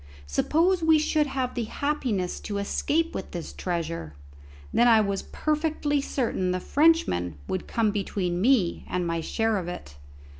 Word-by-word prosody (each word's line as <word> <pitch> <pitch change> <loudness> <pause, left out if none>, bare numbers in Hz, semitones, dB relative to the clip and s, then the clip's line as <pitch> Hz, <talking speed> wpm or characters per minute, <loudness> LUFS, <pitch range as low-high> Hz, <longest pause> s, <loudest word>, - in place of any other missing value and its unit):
Suppose 335 - +2
we 320 -1 +5
should 305 0 +1
have 260 -2 -2
the 240 -3 -2
happiness 235 -8 -2
to 205 -2 -4
escape 310 +11 0
with 190 - -5
this 170 -2 -6
treasure, 165 - -4 0.6
then 240 - +5
I 225 -2 +7
was 200 -2 0
perfectly 305 -2 -1
certain 235 -9 -1
the 180 0 0
Frenchman 180 - +2
would 185 - -3
come 225 -2 +1
between 185 -3 -2
me 220 -7 +2
and 180 -1 -1
my 165 -1 -1
share 225 +5 0
of 175 - -6
it. 70 - -8
215 Hz, 155 wpm, -26 LUFS, 180-290 Hz, 0.6 s, I